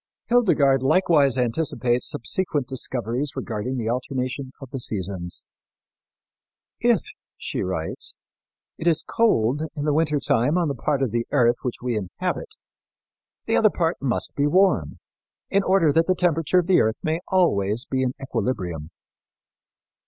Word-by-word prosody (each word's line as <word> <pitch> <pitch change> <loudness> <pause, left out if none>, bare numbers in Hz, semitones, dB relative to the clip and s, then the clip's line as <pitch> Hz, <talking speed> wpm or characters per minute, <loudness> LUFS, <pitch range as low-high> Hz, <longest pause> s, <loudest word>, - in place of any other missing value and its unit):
Hildegard 150 - +4
likewise 145 -3 +3
anticipates 125 -1 0
subsequent 145 +2 -1
discoveries 130 +1 -2
regarding 120 +4 -3
the 115 -2 -3
alternation 130 +2 -3
of 135 -3 -11
the 135 - -4
seasons. 95 -6 -2 1.4
"If," - - +3 0.4
she - - -4
writes, 90 -3 -3 0.6
"it 165 - -2
is 165 -2 +3
cold 145 - +1
in 145 - -3
the 150 - +2
winter 150 -1 +1
time 125 +5 +1
on 170 -4 +1
the - - -1
part 135 +2 -1
of 125 - -1
the 115 0 -1
earth 120 -4 +3
which 125 -1 -4
we 125 -2 -1
inhabit, 95 -4 -4 0.9
the - - +1
other - - +5
part - - -1
must - - -1
be 145 +1 +1
warm, 175 - +2 0.5
in 200 - +3
order 185 -5 +3
that 165 +3 +2
the 185 - +3
temperature 170 -1 +1
of 180 - +3
the 185 0 +4
earth 110 +1 0
may 160 +1 0
always 115 - +2
be 130 -1 -1
in 130 -1 0
equilibrium." 90 - -3
135 Hz, 145 wpm, -23 LUFS, 115-160 Hz, 1.4 s, other